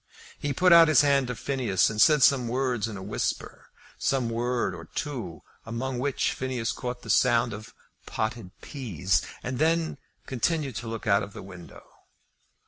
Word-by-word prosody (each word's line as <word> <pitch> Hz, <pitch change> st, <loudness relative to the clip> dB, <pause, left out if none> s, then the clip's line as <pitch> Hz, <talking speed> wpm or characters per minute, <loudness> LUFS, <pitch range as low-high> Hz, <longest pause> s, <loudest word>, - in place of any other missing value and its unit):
He 145 Hz, -, -2 dB
put 180 Hz, +6 st, +4 dB
out 165 Hz, -1 st, +9 dB
his 155 Hz, -, +6 dB
hand 140 Hz, -2 st, +3 dB
to 125 Hz, -, -4 dB
Phineas, 120 Hz, -9 st, +1 dB
and 110 Hz, 0 st, 0 dB
said 150 Hz, -4 st, +6 dB
some 130 Hz, -3 st, +4 dB
word 125 Hz, -2 st, -1 dB
in 110 Hz, -3 st, -6 dB
a 95 Hz, -, -8 dB
whisper, -, -, -4 dB, 0.3 s
some 130 Hz, -4 st, 0 dB
word 120 Hz, -2 st, -1 dB
or 85 Hz, -1 st, -9 dB
two 120 Hz, -, -5 dB, 0.2 s
among 120 Hz, +3 st, -4 dB
which 140 Hz, +1 st, 0 dB
Phineas 130 Hz, -3 st, -2 dB
caught 125 Hz, -1 st, -5 dB
the 115 Hz, -, -10 dB
sound 120 Hz, +2 st, +3 dB
of 105 Hz, +1 st, -10 dB, 0.3 s
"potted 110 Hz, -3 st, -3 dB
peas," 95 Hz, -, -1 dB, 0.2 s
and 130 Hz, 0 st, -4 dB
then 160 Hz, -2 st, +1 dB, 0.3 s
continued 135 Hz, +1 st, -1 dB
to 115 Hz, -, -6 dB
look 115 Hz, +2 st, -5 dB
out 100 Hz, -2 st, +3 dB
of 100 Hz, -1 st, -7 dB
the -, -, -9 dB
window. 90 Hz, -3 st, -12 dB
125 Hz, 170 wpm, -27 LUFS, 110-135 Hz, 0.3 s, out